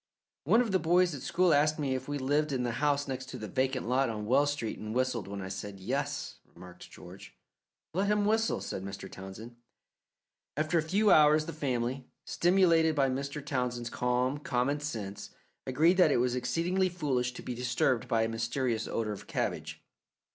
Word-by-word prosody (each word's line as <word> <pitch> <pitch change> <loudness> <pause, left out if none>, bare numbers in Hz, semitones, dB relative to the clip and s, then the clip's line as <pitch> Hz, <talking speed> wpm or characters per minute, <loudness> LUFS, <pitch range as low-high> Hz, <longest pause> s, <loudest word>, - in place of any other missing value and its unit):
"One 220 - +5
of 230 -4 -1
the 190 - +3
boys 175 +1 +3
at 140 - -6
school 175 +3 +2
asked 150 +1 +3
me 140 -4 -1
if 130 0 -4
we 145 0 -2
lived 145 +3 0
in 130 -2 -1
the 120 - -1
house 145 -1 +1
next 130 -1 -5
to 130 - -6
the 110 -3 -6
vacant 130 -1 -1
lot 130 +1 +2
on 105 -2 -4
Wells 140 +6 +3
Street 120 -7 -4
and 110 +1 -5
whistled 125 -5 0
when 100 -1 -5
I - - -5
said 100 +1 -6
'Yes,'" 140 +7 -3 0.2
remarked 90 -1 -12
George. - - -13 0.6
"Let 190 +4 0
him 210 0 +2
whistle," 220 +1 +1
said 95 - -5
Mr. 100 0 -7
Townsend. 100 +5 -10 1.0
After 155 +2 +1
a - - +2
few 200 +7 +2
hours 150 0 +6
the 165 - -6
family, 130 -3 -2 0.2
stimulated 170 -3 +3
by 135 -2 +3
Mr. 140 +2 -4
Townsend's 125 -3 -2
calm, 125 +3 0
common 145 -2 0
sense, 110 -9 -5 0.4
agreed 160 +8 +3
that 180 -5 +5
it - - +3
was 125 0 +1
exceedingly 175 +9 0
foolish 135 -8 -1
to - - -9
be 125 - -4
disturbed 125 0 0
by 115 -1 +2
a - - +1
mysterious 115 +1 -1
odour 110 -2 -2
of 100 - -10
cabbage. - - -3
135 Hz, 190 wpm, -30 LUFS, 120-155 Hz, 1.0 s, hours